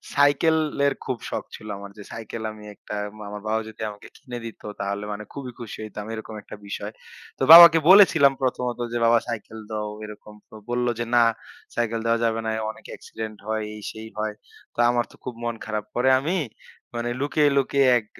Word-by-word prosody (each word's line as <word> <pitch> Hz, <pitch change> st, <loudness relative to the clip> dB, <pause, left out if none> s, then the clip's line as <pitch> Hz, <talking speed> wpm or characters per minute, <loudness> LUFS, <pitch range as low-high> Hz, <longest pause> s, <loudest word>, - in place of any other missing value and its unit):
সাইকেলের 145 Hz, 0 st, +3 dB
খুব 130 Hz, -, -2 dB
শখ -, -, -3 dB
ছিল 105 Hz, -, -11 dB
আমার 100 Hz, 0 st, -9 dB
যে 105 Hz, -, -9 dB
সাইকেল, 115 Hz, 0 st, -6 dB
আমি 105 Hz, 0 st, -12 dB
একটা 105 Hz, -, -8 dB, 0.3 s
আমার 105 Hz, 0 st, -7 dB
বাবা 110 Hz, +1 st, +1 dB
যদি 110 Hz, -, -12 dB
আমাকে 105 Hz, 0 st, -11 dB
কিনে 120 Hz, -1 st, -8 dB
দিত 115 Hz, -, -9 dB, 0.2 s
তাহলে 100 Hz, +1 st, -2 dB
মানে 105 Hz, +1 st, -6 dB
খুবই 130 Hz, -3 st, -6 dB
খুশি 115 Hz, -3 st, -7 dB
হইতাম, 105 Hz, -1 st, -7 dB
এরকম 110 Hz, 0 st, -7 dB
একটা -, -, -10 dB
বিষয়। 100 Hz, +1 st, -5 dB, 0.5 s
তো -, -, 0 dB
বাবাকে 170 Hz, 0 st, +12 dB
বলেছিলাম 165 Hz, -8 st, +7 dB
প্রথমত 125 Hz, -2 st, -1 dB
যে, -, -, 0 dB
"বাবা 115 Hz, 0 st, +5 dB
সাইকেল 110 Hz, -1 st, -6 dB
দাও 105 Hz, -1 st, -3 dB, 0.2 s
এরকম।" 105 Hz, 0 st, -11 dB, 0.2 s
তো -, -, -14 dB
বলল 120 Hz, 0 st, 0 dB
যে, 120 Hz, -, -1 dB
"না 120 Hz, -, +7 dB, 0.5 s
সাইকেল 115 Hz, -1 st, 0 dB
দেওয়া 115 Hz, 0 st, +2 dB
যাবে 115 Hz, 0 st, 0 dB
না। 110 Hz, -, 0 dB, 0.2 s
অনেক -, -, -18 dB
অ্যাক্সিডেন্ট 110 Hz, -1 st, -7 dB
হয়।" 110 Hz, 0 st, -1 dB
এই, 105 Hz, -, -9 dB
সেই 110 Hz, 0 st, -9 dB
হয়। 110 Hz, 0 st, -2 dB, 0.4 s
তো -, -, -12 dB
আমার 120 Hz, 0 st, +1 dB
তো -, -, -16 dB
খুব 125 Hz, -, -5 dB
মন 120 Hz, -1 st, -2 dB
খারাপ 105 Hz, -1 st, -3 dB
পরে 125 Hz, +2 st, +3 dB
আমি 170 Hz, +7 st, 0 dB, 0.6 s
মানে 120 Hz, 0 st, -2 dB
লুকিয়ে, 145 Hz, +1 st, +2 dB
লুকিয়ে 140 Hz, 0 st, +3 dB
এক 110 Hz, -, -15 dB
115 Hz, 190 wpm, -24 LUFS, 110-135 Hz, 0.6 s, বাবাকে